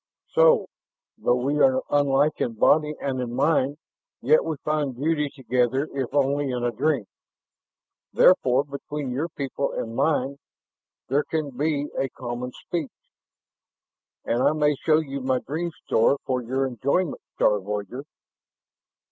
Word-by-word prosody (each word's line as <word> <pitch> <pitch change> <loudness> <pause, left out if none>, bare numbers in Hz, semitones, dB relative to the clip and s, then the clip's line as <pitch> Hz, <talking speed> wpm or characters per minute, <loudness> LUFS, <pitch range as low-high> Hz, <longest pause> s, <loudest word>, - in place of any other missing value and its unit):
"So, - - +5 0.5
though 120 - +1
we 140 +4 0
are 260 - +4
unlike 145 +1 +2
in 120 - 0
body 150 +6 +3
and 130 -2 -2
in 120 -1 -4
mind, 145 0 +2 0.4
yet 150 +6 +4
we 160 - -2
find 150 -4 0
beauty 150 +2 0
together 130 +1 0
if 135 -3 -3
only 140 0 +1
in 125 -1 -2
a 120 - +1
dream. 135 0 0 1.1
Therefore, 135 -7 +4
between 140 -1 -6
your 145 +7 -2
people 140 -2 -3
and 115 0 -4
mine 140 -2 +1 0.7
there 140 +3 +2
can 155 -3 -3
be 145 +1 -1
a 135 - 0
common 125 0 -5
speech. 160 +1 -4 1.4
And 120 +2 0
I - - +4
may 150 -1 +2
show 155 +2 +2
you 140 -3 -3
my 130 0 +1
dream 160 +7 -3 0.2
store 115 +5 +3
for 130 -1 -1
your 130 +3 -1
enjoyment, 140 - -1
star 105 -1 +3
voyager." 105 +6 -5
140 Hz, 140 wpm, -24 LUFS, 125-150 Hz, 1.4 s, So